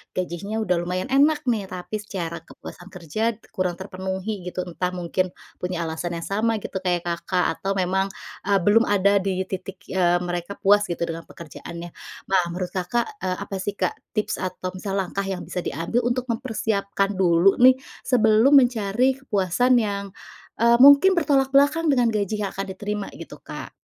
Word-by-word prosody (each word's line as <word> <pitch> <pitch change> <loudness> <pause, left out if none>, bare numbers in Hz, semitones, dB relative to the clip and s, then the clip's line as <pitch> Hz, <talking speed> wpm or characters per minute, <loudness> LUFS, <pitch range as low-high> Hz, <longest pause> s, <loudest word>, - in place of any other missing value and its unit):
gajinya 185 +3 -3
udah 180 -4 +1
lumayan 180 +7 -3
enak 295 +3 +4
nih, 225 -6 0
tapi 185 +4 -5
secara 175 -5 -5
kepuasan 175 +2 -11
kerja 200 +6 -2
d 230 - -29
kurang 180 -2 -1
terpenuhi 190 +1 -5
gitu, 180 0 -3
entah 180 +1 -3
mungkin 180 +1 -1 0.3
punya 180 -1 -2
alasan 165 +1 -3
yang 165 - -5
sama 220 +4 0
gitu, 190 - -4
kayak 180 -2 -1
Kakak 175 +1 -1
atau 195 0 -1
memang, 190 +1 +1 0.4
eee, 200 -1 +4
belum 225 +5 +4
ada 200 0 +3
di 190 -1 -1
titik, 190 +1 -7
eee, 175 -1 +2
mereka 175 +2 -4
puas 205 +1 +3
gitu 170 -1 -3
dengan 165 0 -5
pekerjaannya. 170 +1 -9 0.4
Nah, 190 -1 +5
menurut 180 +1 -4
Kakak, 235 - -2
eee, 185 0 -2
apa 195 - -6
sih, 200 +2 -3
Kak, - - 0 0.2
tips 210 - -1
atau 185 0 -4
misal 195 +1 -5
langkah 195 0 -2
yang 185 -2 -3
bisa 180 -1 -4
diambil 170 - -1
untuk 245 +1 -1
mempersiapkan 220 -5 -1
dulu 180 +1 +4
nih, 255 +1 +8 0.3
sebelum 225 +1 +4
mencari 250 -1 +3
kepuasan 245 +1 +2
yang, 200 -1 -2 0.6
eee, 235 0 +6
mungkin 285 +8 +7
bertolak 280 -5 +2
belakang 290 +4 +3
dengan 250 -4 +3
gaji 210 0 -1
Kakak 195 0 -4
diterima? 210 -1 -4
Gitu, - - -10
Kak. - - -8
195 Hz, 170 wpm, -23 LUFS, 180-225 Hz, 0.6 s, nih